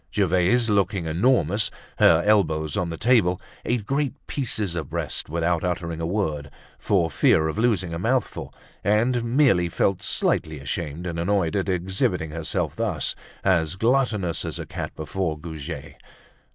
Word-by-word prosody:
Gervaise, 95 +4 +2
looking 100 -4 +1
enormous, 100 - +2 0.3
her 85 +1 +6
elbows 80 -8 +2
on 90 -2 -1
the 80 - -5
table, 105 -6 +3 0.2
ate 120 -3 -1
great 140 +2 -1
pieces 110 - -2
of 80 -5 -4
breast, - - -2
without 85 +1 0
uttering 85 -2 -2
a 80 - -1
word, 80 -7 -2 0.3
for 85 -6 +1
fear 80 +2 +3
of 80 +7 -3
losing 100 -8 +1
a 85 - -3
mouthful, 125 +7 -1 0.3
and 115 +5 +2
merely 115 -8 +3
felt 95 +2 0
slightly 80 -1 0
ashamed 75 +4 -4
and 85 -2 -3
annoyed 90 -1 +1
at 100 -1 0
exhibiting 90 -3 -1
herself 80 -1 -2
thus, - - 0 0.3
as 85 -3 +2
gluttonous 110 -5 +1
as - - -4
a - - -5
cat - - -5
before 80 0 -3
Goujet. 80 -2 -7
90 Hz, 150 wpm, -24 LUFS, 80-105 Hz, 0.3 s, her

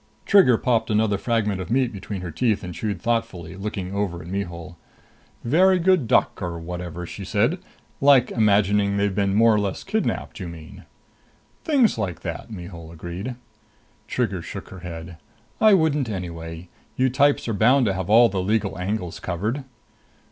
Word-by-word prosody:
Trigger 185 - +6
popped 120 -2 +1
another 105 -2 +2
fragment 105 -5 0
of 90 - -7
meat 125 -1 +1
between 100 -1 -6
her 90 -2 -5
teeth 110 +3 0
and 90 -1 -6
chewed 105 +3 -3
thoughtfully, 115 -8 -2
looking 95 -2 -5
over 95 -4 -2
at - - -11
Mihul. 90 -2 -5 0.7
"Very 185 +9 +4
good 180 -7 +3
duck - - +2
or 85 -2 -3
whatever!" 90 0 -6
she 100 - -8
said. 115 - +1 0.4
"Like 135 -3 +5
imagining 100 -2 +2
they've 100 -1 +1
been 100 0 +1
more 115 +1 +5
or 105 - +2
less 100 -2 -3
kidnapped, - - -2
you 90 - -5
mean?" 80 -2 -11 0.8
"Things 265 - +3
like 90 -6 -3
that," 85 +5 -6
Mihul 85 -5 -9
agreed. 90 +9 -6 0.7
Trigger 100 -8 -1
shook - - -8
her 95 - -10
head. 85 -1 -8 0.4
"I 215 -2 +7
wouldn't 150 -7 +1
anyway. 85 -3 -6 0.3
You 130 0 +2
types 145 +1 +2
are 115 - -1
bound 125 +6 +4
to 100 - +1
have 95 0 -4
all 115 +3 +7
the 95 -3 -2
legal 100 -3 -1
angles 90 -2 -3
covered." 105 +10 -3
100 Hz, 165 wpm, -23 LUFS, 90-115 Hz, 0.8 s, I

